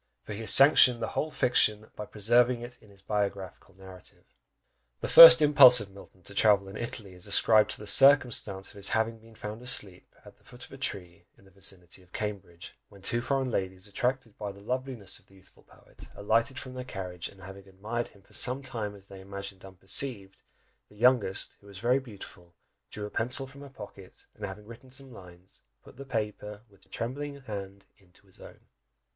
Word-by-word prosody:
for -, -, -8 dB
he 100 Hz, -, -7 dB
has 115 Hz, -, -2 dB
sanctioned 135 Hz, -3 st, +7 dB
the -, -, -4 dB
whole 155 Hz, -, -3 dB
fiction, 110 Hz, -6 st, +1 dB
by 105 Hz, -, -8 dB
preserving 120 Hz, +3 st, +1 dB
it 120 Hz, +1 st, -9 dB
in -, -, -20 dB
his 100 Hz, -1 st, -21 dB
biographical 100 Hz, -2 st, -4 dB
narrative! 95 Hz, -1 st, -12 dB, 0.8 s
The -, -, -4 dB
first 165 Hz, -1 st, +10 dB
impulse 140 Hz, -4 st, +7 dB
of 100 Hz, -2 st, -8 dB
Milton 95 Hz, -1 st, -17 dB
to 100 Hz, -, -13 dB
travel 100 Hz, -1 st, +2 dB
in 95 Hz, -, -10 dB
Italy 110 Hz, -4 st, -7 dB
is 90 Hz, -1 st, -10 dB
ascribed 110 Hz, -2 st, +6 dB
to -, -, -5 dB
the 105 Hz, -, -11 dB
circumstance 120 Hz, -5 st, +3 dB
of -, -, -16 dB
his 100 Hz, -, -2 dB
having 110 Hz, 0 st, -1 dB
been 115 Hz, 0 st, -19 dB
found 105 Hz, +2 st, -8 dB
asleep 105 Hz, -7 st, -4 dB
at -, -, -16 dB
the -, -, -31 dB
foot 125 Hz, 0 st, -14 dB
of -, -, -21 dB
a 135 Hz, -, -11 dB
tree 90 Hz, -7 st, -6 dB
in -, -, -23 dB
the 95 Hz, -, -21 dB
vicinity 95 Hz, -2 st, -8 dB
of 90 Hz, -1 st, -25 dB
Cambridge, 100 Hz, -4 st, -7 dB
when 100 Hz, -2 st, -17 dB
two 120 Hz, +4 st, -1 dB
foreign 130 Hz, +1 st, -2 dB
ladies, 95 Hz, -1 st, -4 dB
attracted 125 Hz, +2 st, -3 dB
by 105 Hz, -1 st, -5 dB
the 100 Hz, -, -15 dB
loveliness 125 Hz, -2 st, -5 dB
of -, -, -26 dB
the 95 Hz, -, -22 dB
youthful 95 Hz, -, -19 dB
poet, -, -, -18 dB
alighted 115 Hz, +6 st, 0 dB
from 130 Hz, -1 st, -8 dB
their 130 Hz, 0 st, -7 dB
carriage, 90 Hz, -7 st, -7 dB
and 100 Hz, -, -18 dB
having 95 Hz, +1 st, -12 dB
admired 105 Hz, +5 st, -5 dB
him 100 Hz, -, -22 dB
for -, -, -25 dB
some 130 Hz, +2 st, -1 dB
time 110 Hz, -6 st, -6 dB
as 100 Hz, -1 st, -16 dB
they 95 Hz, -1 st, -12 dB
imagined 100 Hz, 0 st, -9 dB
unperceived, 95 Hz, +2 st, -3 dB, 0.5 s
the 105 Hz, -, -20 dB
youngest, 110 Hz, -4 st, +1 dB
who 100 Hz, -, -19 dB
was 100 Hz, -1 st, -12 dB
very 120 Hz, +6 st, +1 dB
beautiful, 100 Hz, -8 st, -14 dB, 0.3 s
drew 105 Hz, -, -7 dB
a 105 Hz, -, -9 dB
pencil 125 Hz, +4 st, -1 dB
from 140 Hz, +1 st, -15 dB
her 140 Hz, -, -11 dB
pocket, 100 Hz, -6 st, -13 dB
and -, -, -7 dB
having 100 Hz, +2 st, -10 dB
written 115 Hz, +3 st, -14 dB
some 130 Hz, 0 st, -10 dB
lines, 90 Hz, -2 st, -16 dB, 0.2 s
put -, -, -17 dB
the 140 Hz, -, -9 dB
paper 105 Hz, -4 st, -5 dB
with 100 Hz, -, -23 dB
her -, -, -31 dB
trembling 140 Hz, +4 st, -6 dB
hand 100 Hz, -4 st, -8 dB
into 95 Hz, 0 st, -26 dB
his 95 Hz, -, -22 dB
own! -, -, -14 dB
105 Hz, 205 wpm, -28 LUFS, 95-125 Hz, 0.8 s, first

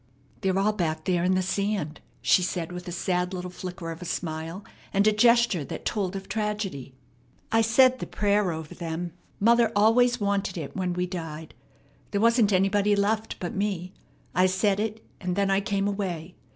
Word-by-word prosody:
"They're 190 Hz, -1 st, 0 dB
all 205 Hz, +2 st, +2 dB
back 165 Hz, -6 st, -2 dB
there 175 Hz, -2 st, +1 dB
in 185 Hz, +1 st, +3 dB
the 185 Hz, -, +1 dB
sand," 195 Hz, -5 st, -2 dB, 0.2 s
she -, -, +5 dB
said 175 Hz, -1 st, -2 dB
with 180 Hz, 0 st, -7 dB
a -, -, -4 dB
sad 180 Hz, +1 st, -1 dB
little 180 Hz, 0 st, -5 dB
flicker 180 Hz, -2 st, -6 dB
of 165 Hz, +2 st, -8 dB
a -, -, -6 dB
smile 165 Hz, +3 st, -4 dB, 0.3 s
and 200 Hz, +1 st, +2 dB
a 215 Hz, -, +6 dB
gesture 235 Hz, -5 st, +4 dB
that -, -, -7 dB
told 200 Hz, -4 st, -1 dB
of 195 Hz, 0 st, -6 dB
tragedy. 200 Hz, -, -3 dB, 0.6 s
"I 225 Hz, -, +4 dB
said 255 Hz, +3 st, +5 dB
the -, -, -5 dB
prayer 205 Hz, -2 st, +1 dB
over 160 Hz, -1 st, -6 dB
them. 170 Hz, 0 st, -4 dB, 0.3 s
Mother 235 Hz, +2 st, +4 dB
always 240 Hz, +4 st, +4 dB
wanted 200 Hz, -2 st, -1 dB
it 150 Hz, -4 st, -6 dB
when 185 Hz, -2 st, -1 dB
we 180 Hz, +1 st, -1 dB
died. 165 Hz, -3 st, -6 dB, 0.6 s
There 200 Hz, -, -1 dB
wasn't 230 Hz, -2 st, +4 dB
anybody 200 Hz, +2 st, +3 dB
left 215 Hz, +2 st, 0 dB
but 175 Hz, -, -4 dB
me. 190 Hz, -2 st, -2 dB, 0.4 s
I 185 Hz, +1 st, +4 dB
said 195 Hz, +2 st, +1 dB
it, 220 Hz, +1 st, -3 dB
and 180 Hz, -1 st, -2 dB
then 200 Hz, 0 st, +1 dB
I 195 Hz, +1 st, +3 dB
came 200 Hz, 0 st, 0 dB
away. 185 Hz, -4 st, -3 dB
195 Hz, 185 wpm, -26 LUFS, 180-210 Hz, 0.6 s, a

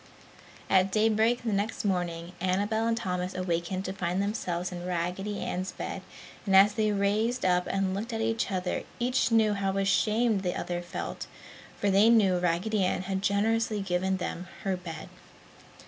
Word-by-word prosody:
At 190 Hz, 0 st, +3 dB
daybreak 220 Hz, +3 st, +2 dB
the 225 Hz, -3 st, -1 dB
next 205 Hz, +2 st, -1 dB
morning 175 Hz, -3 st, -1 dB
Annabel 205 Hz, +5 st, +1 dB
and 230 Hz, 0 st, +1 dB
Thomas 180 Hz, -4 st, -3 dB
awakened 185 Hz, +1 st, -2 dB
to 190 Hz, -, -3 dB
find 180 Hz, -1 st, -2 dB
themselves 185 Hz, -4 st, -2 dB
in 175 Hz, -1 st, -6 dB
Raggedy 180 Hz, +3 st, -2 dB
Ann's 185 Hz, +1 st, -3 dB
bed -, -, -5 dB, 0.4 s
and 195 Hz, -2 st, +2 dB
as 200 Hz, +2 st, +7 dB
they 215 Hz, 0 st, +1 dB
raised 210 Hz, +4 st, +1 dB
up 180 Hz, -1 st, +2 dB
and 195 Hz, -1 st, 0 dB
looked 215 Hz, +5 st, -4 dB
at 225 Hz, -, -3 dB
each 225 Hz, 0 st, 0 dB
other 185 Hz, -2 st, -1 dB, 0.2 s
each 250 Hz, 0 st, +1 dB
knew 220 Hz, -2 st, +4 dB
how 195 Hz, -1 st, -1 dB
ashamed 210 Hz, +2 st, +2 dB
the 180 Hz, -2 st, -2 dB
other 175 Hz, 0 st, -3 dB
felt, 175 Hz, -, -6 dB, 0.5 s
for 205 Hz, -, +2 dB
they 200 Hz, +4 st, +6 dB
knew 200 Hz, -6 st, +4 dB
Raggedy 180 Hz, +4 st, +1 dB
Ann 185 Hz, 0 st, 0 dB
had 190 Hz, 0 st, -2 dB
generously 215 Hz, +2 st, +1 dB
given 190 Hz, 0 st, 0 dB
them 180 Hz, 0 st, -5 dB, 0.2 s
her 190 Hz, -1 st, 0 dB
bed. 170 Hz, -3 st, -7 dB
195 Hz, 165 wpm, -28 LUFS, 180-215 Hz, 0.5 s, as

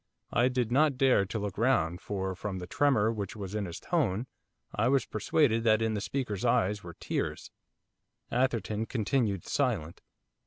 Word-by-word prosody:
I 120 Hz, -, +4 dB
did 125 Hz, -2 st, -1 dB
not 140 Hz, +1 st, +3 dB
dare 130 Hz, -8 st, +4 dB
to 110 Hz, -, -3 dB
look 105 Hz, -2 st, -4 dB
round 90 Hz, -9 st, +2 dB
for, 95 Hz, -2 st, -3 dB
from 95 Hz, +1 st, -5 dB
the 90 Hz, -, -5 dB
tremor 115 Hz, -1 st, +2 dB
which 100 Hz, -4 st, -5 dB
was 100 Hz, -2 st, -6 dB
in 105 Hz, -1 st, -1 dB
his 85 Hz, -2 st, -6 dB
tone, 125 Hz, -, 0 dB, 0.5 s
I 110 Hz, +3 st, +1 dB
was 135 Hz, +1 st, +3 dB
persuaded 115 Hz, +1 st, +1 dB
that 110 Hz, -1 st, +5 dB
in 110 Hz, -1 st, 0 dB
the 105 Hz, -, -2 dB
speaker's 120 Hz, -5 st, -3 dB
eyes 110 Hz, -4 st, +2 dB
were 85 Hz, -2 st, -9 dB
tears. -, -, -3 dB, 0.8 s
Atherton 115 Hz, -3 st, 0 dB
continued 110 Hz, -5 st, 0 dB
silent. 105 Hz, -, -1 dB
110 Hz, 165 wpm, -30 LUFS, 100-125 Hz, 0.8 s, that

